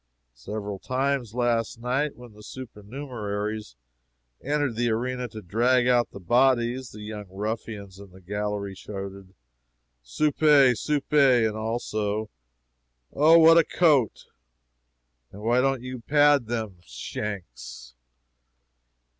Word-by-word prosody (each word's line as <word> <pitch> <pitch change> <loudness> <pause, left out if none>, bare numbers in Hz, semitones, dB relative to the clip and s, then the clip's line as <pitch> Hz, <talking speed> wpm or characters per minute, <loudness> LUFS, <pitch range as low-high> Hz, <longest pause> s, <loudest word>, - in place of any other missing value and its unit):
Several 100 - -6
times 130 -2 -1
last 120 -2 0
night, 130 +5 -1
when 120 -2 -13
the 105 - -15
supernumeraries 105 - -6 0.7
entered 145 -3 0
the 120 +1 0
arena 125 +2 -2
to 110 -1 -10
drag 120 +7 +2
out 120 -1 +3
the - - -10
bodies, 120 +4 +2
the 105 - -11
young 105 -1 -7
ruffians 100 -1 -5
in 100 -1 -12
the 95 +1 -16
gallery 105 +1 -4
shouted, 95 -1 -8 0.7
"Supe! 140 - +4
supe!" 150 +4 -2 0.3
and 110 - -4
also, 110 -1 -2 0.8
"Oh, 155 +4 +6
what 165 0 +8
a - - +5
coat!" 145 - +2 1.1
and 105 +2 -11
"Why 120 +3 +3
don't 135 -2 0
you 130 0 -6
pad 145 0 +3
them 110 -5 -4
shanks?" 65 - -7
115 Hz, 115 wpm, -25 LUFS, 105-130 Hz, 1.1 s, what